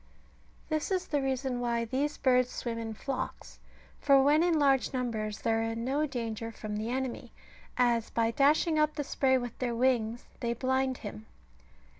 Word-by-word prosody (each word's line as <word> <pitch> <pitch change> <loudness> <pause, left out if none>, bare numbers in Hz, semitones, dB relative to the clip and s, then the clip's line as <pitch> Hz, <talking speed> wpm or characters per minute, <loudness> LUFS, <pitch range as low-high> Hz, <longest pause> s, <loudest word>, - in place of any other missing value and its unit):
This 310 -1 -1
is 375 -2 0
the 290 -2 0
reason 265 -1 -1
why 235 -1 0
these 280 +6 -1
birds 255 -1 +3
swim 230 -2 -4
in 225 -1 -5
flocks, 270 +4 -5 0.4
for 275 -1 +5
when 290 +3 +4
in 340 -2 +3
large 275 -2 +3
numbers 220 -4 -2
they - - +1
are 225 0 +2
in 225 +1 -2
no 290 +4 +1
danger 230 -3 -4
from 215 -1 -6
the 220 +2 -3
enemy; 260 0 -3 0.5
as 240 -2 +2
by 230 0 +1
dashing 305 +5 +3
up 305 0 +2
the 290 - -2
spray 265 -1 +2
with 245 -2 -5
their 240 -2 -1
wings 240 -2 +1
they 235 -1 -1
blind 260 +1 0
him. 105 +1 -7
250 Hz, 175 wpm, -30 LUFS, 230-275 Hz, 0.5 s, for